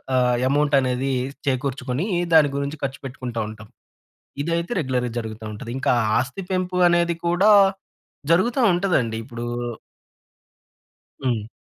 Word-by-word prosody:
ఆహ్, 125 -1 +3
ఎమౌంటనేదీ 135 -2 +1 0.3
చేకూర్చుకొనీ, 130 - -1 0.3
దాని 155 -3 +6
గురించి 140 +2 -3
ఖర్చు 135 +1 -5
పెట్టుకుంటా 125 -3 -5
ఉంటాం. 110 0 -11 0.7
ఇదైతే 170 +4 -2
రెగ్యులర్‌గా 125 -4 -1
జరుగుతా 110 -1 -6
ఉంటది. 105 +2 -8
ఇంకా 130 - +1 0.3
ఆస్తి 135 +10 -3
పెంపు 185 -1 -1
అనేది 170 0 +2
కూడా 180 +5 +4 0.8
జరుగుతా 230 +10 +2
ఉంటదండి. 170 - +1
ఇప్పుడూ 120 -1 -6 1.8
హ్మ్. 115 -4 -1
135 Hz, 110 wpm, -23 LUFS, 125-170 Hz, 1.8 s, దాని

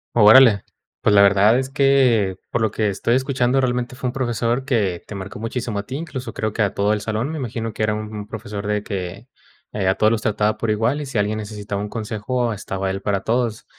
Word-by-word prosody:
Órale. 110 -1 +7 0.4
Pues, 105 - +3
la 100 - +7
verdad 100 +4 +5
es 130 0 -3
que, 130 -9 +3
por 120 - -1
lo 110 -2 +1
que 110 0 0
estoy 110 +4 0
escuchando, 130 -1 +1
realmente, 125 -1 -1
fue 130 0 -3
un - - -6
profesor 120 0 -1
que 105 -10 0
te 105 - -8
marcó 100 +1 -7
muchísimo 115 -1 -3
a 100 - -5
ti, 130 - -6
incluso 140 -4 -6
creo 110 -1 -2
que 110 - +1
a 100 -1 -1
todo 100 +1 +1
el 105 - -2
salón, 110 +5 -2
me 160 - -4
imagino 115 -4 -4
que 110 - -3
era 105 0 +1
un 105 -1 -6
profesor 105 -2 -6
de 105 -1 -1
que 95 +3 -5 0.5
a 95 -2 +1
todos 110 +2 +3
los 115 -1 0
trataba 105 0 0
por 115 - -1
igual, 115 +7 0
y, - - -4
si 135 -4 -4
alguien 105 +1 0
necesitaba 105 -1 -5
un 105 - -4
consejo, 115 +2 -2
estaba 95 -1 -4
él 95 +1 -3
para 100 -1 -1
todos. 115 -1 -1
110 Hz, 225 wpm, -21 LUFS, 105-125 Hz, 0.5 s, Órale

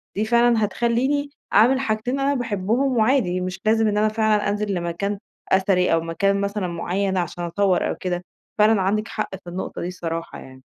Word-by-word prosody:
دي 210 +3 0
فعلًا 235 -1 +3
هتخليني 255 +7 0 0.2
أعمل 245 +6 +5
حاجتين 245 +1 -1
أنا 275 +1 +2
باحبهم 240 +2 0
وعادي، 215 -6 +2
مش 185 +1 -4
لازم 220 0 +3
إن 210 0 0
أنا 215 - +3
فعلًا 215 -1 +1
أنزل 205 -1 -1
لمكان 175 +4 -2 0.3
أثري 190 -2 +3
أو 165 - +2
مكان 195 +4 0
مثلًا 200 -1 -2
معين 185 +3 -2
عشان 175 0 -3
أصور 185 +2 +1
أو - - -2
كده، 180 -1 -3 0.3
فعلًا 215 -1 +4
عندِك 210 +3 0
حق 215 - -3
في 175 - -9
النقطة 180 +2 -5
دي 175 - -3
الصراحة 165 -2 -5
يعني. 130 0 -13
205 Hz, 180 wpm, -22 LUFS, 180-225 Hz, 0.3 s, أعمل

